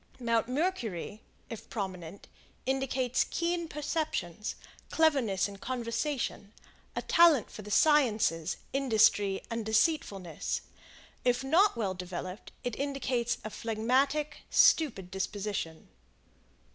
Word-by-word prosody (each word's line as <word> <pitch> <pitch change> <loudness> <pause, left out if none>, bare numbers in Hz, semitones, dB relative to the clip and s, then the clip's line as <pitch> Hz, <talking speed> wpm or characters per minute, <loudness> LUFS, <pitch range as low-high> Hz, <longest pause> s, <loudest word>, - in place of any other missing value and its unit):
Mount 230 -2 +1
Mercury, 245 - -2 0.3
if 225 - -9
prominent, 190 -3 -6 0.4
indicates 260 -1 +1
keen 340 0 -1
perceptions, 300 - -3 0.3
cleverness 270 -13 +2
in 200 -1 -10
conversation, 235 -1 -3 0.4
a - - -2
talent 330 -8 +5
for - - -8
the 210 - -10
sciences, 215 - +3 0.2
industry, 220 -7 +3
and 230 0 -2
deceitfulness. 215 - 0 0.6
If 245 +1 +2
not 340 +8 +4
well 200 -5 -1
developed, 180 +2 -7
it 245 -3 -2
indicates 265 -4 -1
a 215 - -5
phlegmatic, 265 +8 0
stupid 205 - +4
disposition. 190 -3 -4
230 Hz, 100 wpm, -30 LUFS, 200-280 Hz, 0.6 s, talent